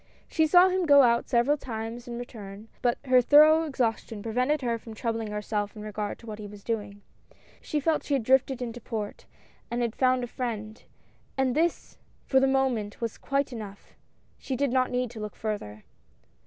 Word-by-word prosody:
She 320 -1 +2
saw 360 +3 +7
him 370 -2 0
go 285 -1 +8
out 235 -1 +2
several 245 +5 +3
times 235 -1 -6
and 235 -1 -5
return, 215 -3 -9
but 240 -1 +1
her 255 -1 +5
thorough 305 +5 +6
exhaustion 225 -6 -2
prevented 255 +6 0
her 235 -2 0
from 225 -1 -10
troub 230 +1 -2
ling 225 -1 -3
herself 210 0 -3
in 210 - -8
regard 210 -1 -4
to - - -16
what 215 -2 -7
he 210 - -7
was 205 0 -12
doing. 205 -3 -4 0.6
She 300 - -2
felt 310 +2 +1
she 285 - -1
had 265 - -1
drifted 265 +1 +2
into 240 0 -6
port, 215 -3 -5 0.4
and 240 +1 -1
had 235 -1 -2
found 255 -1 +2
a - - -3
friend, 225 -3 -5 0.6
and 265 -2 +1
this 335 +2 -1 0.3
for 265 - +4
the 270 - +3
moment 260 -6 0
was 230 -2 -4
quite 275 -1 -1
enough 205 -4 -9 0.2
— - - -38
she 265 - -3
did 280 0 0
not 255 0 +2
need 250 -1 -1
to 230 - -9
look 210 -1 -6
further. 155 - -5
240 Hz, 195 wpm, -27 LUFS, 215-265 Hz, 0.6 s, go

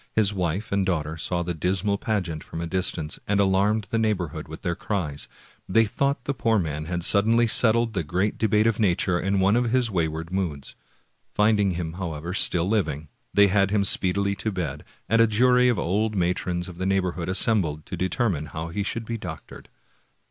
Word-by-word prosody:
His 105 -2 +3
wife 90 +2 -2
and 100 0 +1
daughter 80 -4 -1
saw 85 +2 -2
the 90 0 -3
dismal 95 +5 -1
pageant 90 -8 -2
from - - -8
a 85 - -3
distance, 85 -3 -1
and 100 0 +1
alarmed 100 +2 +2
the 115 - +1
neighborhood 100 -8 -2
with - - -10
their 85 - 0
cries; 80 -7 -3 0.4
they 115 +4 +4
thought 140 +4 -1
the 140 - -2
poor 115 -4 +1
man 75 -4 -2
had 85 +1 -3
suddenly 110 +5 +3
settled 115 0 +3
the 95 -5 -1
great 90 +6 -1
debt 110 0 +2
of 115 -1 +1
nature 90 -3 +2
in 95 +2 0
one 95 +3 +3
of 120 -1 +1
his 125 -2 +1
wayward 80 -2 -2
moods. 85 -8 -3 0.6
Finding 105 -2 +3
him, 85 -2 -4
however, 85 -2 -5
still 90 -2 +1
living, 80 -8 -1 0.2
they 100 0 +5
had 100 0 +2
him 100 -1 +1
speedily 100 +1 +2
to 110 +3 -2
bed, 80 -7 -4 0.2
and 115 +2 +3
a 115 - +6
jury 125 +3 +4
of 120 - +1
old 105 +5 0
matrons 90 -1 -1
of 90 -1 -10
the 95 - -1
neighborhood 90 -3 -1
assembled 95 -6 +1
to - - -6
determine 95 -5 -1
how 80 +2 -6
he 100 +5 -3
should 110 +3 -3
be 115 0 -4
doctored. - - -9
95 Hz, 190 wpm, -25 LUFS, 85-110 Hz, 0.6 s, a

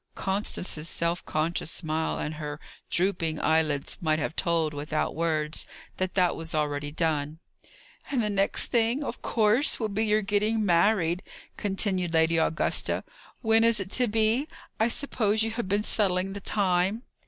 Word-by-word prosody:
Constance's 190 -5 -2
self 170 +2 -1
conscious 160 +1 -1
smile, 160 -2 -2
and 150 - -3
her 150 -1 -6 0.3
drooping 170 -3 0
eyelids 155 -3 +1
might 155 -2 +1
have 155 +1 -3
told, 165 -4 0
without 150 +2 -2
words, 155 -2 -1 0.3
that 185 0 -2
that 180 -2 +3
was 165 0 -4
already 145 -1 -1
done. 155 -2 -1 0.7
"And 255 -5 0
the 210 - -1
next 195 0 +1
thing, 235 +4 +1
of - - -6
course, 225 +5 +2
will 220 -2 -1
be 215 +2 0
your 215 0 +2
getting 210 +2 +1
married!" 175 -1 +2 0.3
continued 190 -4 0
Lady 160 +1 +3
Augusta. 160 0 +1 0.4
"When 225 0 +4
is 230 -1 +4
it 195 0 -5
to 250 -1 +3
be? 225 +6 +2 0.3
I 220 - +3
suppose 225 -4 +1
you 225 - -1
have 225 -4 -4
been 205 +1 +1
settling 195 -3 +1
the 200 - -7
time." 195 +3 +1
185 Hz, 155 wpm, -27 LUFS, 160-215 Hz, 0.7 s, When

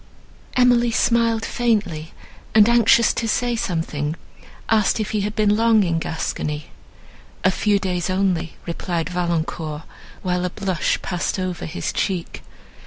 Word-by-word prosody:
Emily 245 -1 +4
smiled 230 -1 +2
faintly, 200 -10 -1 0.4
and, 215 -1 +7
anxious 235 0 +5
to 230 - -2
say 240 +2 0
something, 165 -8 -2 0.5
asked 220 0 +2
if 215 - -2
he 215 - 0
had 210 +2 -3
been 210 -1 +3
long 225 -1 +4
in 165 -3 0
Gascony. 150 -2 -4 0.7
"A 185 - +4
few 205 +2 +2
days 180 -2 -2
only," 185 -4 0
replied 170 -1 -3
Valancourt, 165 -3 -2 0.4
while 180 -1 0
a 180 - 0
blush 185 -2 -1
passed 180 +1 -2
over 185 -2 -3
his 165 - -4
cheek. 185 -4 -2
190 Hz, 135 wpm, -21 LUFS, 170-225 Hz, 0.7 s, and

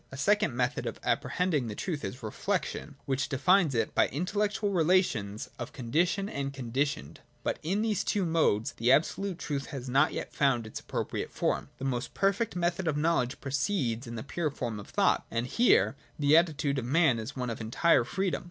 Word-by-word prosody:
A 135 - -8
second 195 - +2
method 125 0 -1
of - - -5
apprehending 165 -9 0
the 105 - -5
truth 155 - -3
is 125 0 -6
Reflection, 155 - -3
which 135 0 -1
defines 155 +2 +3
it 115 - 0
by - - +4
intellectual 205 - -1
relations 160 - +1
of 120 - -6
condition 170 +11 0
and 140 -7 -3
conditioned. 135 - -2 0.2
But - - -1
in 195 +7 0
these 215 -4 0
two 200 -3 0
modes 160 -10 +2
the 120 +2 +1
absolute 180 +6 +2
truth 145 -3 -3
has 135 -2 -6
not 135 +5 +3
yet - - -5
found 130 -5 +2
its 110 - -6
appropriate - - -3
form. - - -1
The 130 - -5
most 130 -1 -2
perfect 200 +3 +1
method 175 0 0
of 150 -2 +1
knowledge 150 -5 +1
proceeds 135 - -1
in 115 - -6
the 110 - -5
pure 155 +2 -2
form 115 -6 -4
of 100 - -10
thought: - - +2
and 115 +1 -1
here 235 - +3 0.2
the 145 +1 +4
attitude 155 -4 +2
of 120 - -4
man 140 -2 +3
is 110 +5 -6
one 125 -2 -2
of 115 - -6
entire 120 +6 +3
freedom. 190 +9 -1
140 Hz, 190 wpm, -29 LUFS, 125-180 Hz, 0.2 s, by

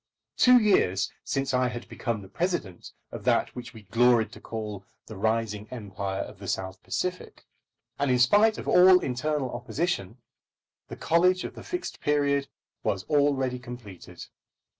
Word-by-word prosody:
Two 250 0 +7
years 100 - +2
since 135 0 -2
I 125 0 +2
had 120 -1 -6
become 115 -4 -4
the - - -11
President 110 - -3 0.2
of - - -7
that - - +1
which 125 -1 -7
we 110 -3 -13
gloried 115 +2 +3
to - - -13
call 105 -3 -6 0.2
the 110 - -10
rising 110 0 -1
Empire 100 -4 -4
of 100 - -12
the 100 - -8
South 95 +2 -3
Pacific. 180 0 -4 0.5
And 140 -1 +1
in 125 - +3
spite 205 - +4
of - - -7
all 180 +1 +7
internal 130 0 -2
opposition, 120 - -3 0.7
the - - -8
college 180 +3 +3
of - - -6
the - - -10
Fixed 360 +1 -5
Period 140 -1 +1 0.3
was 95 -1 -1
already 140 -4 +2
completed. 120 -7 -10
125 Hz, 155 wpm, -27 LUFS, 105-150 Hz, 0.7 s, Two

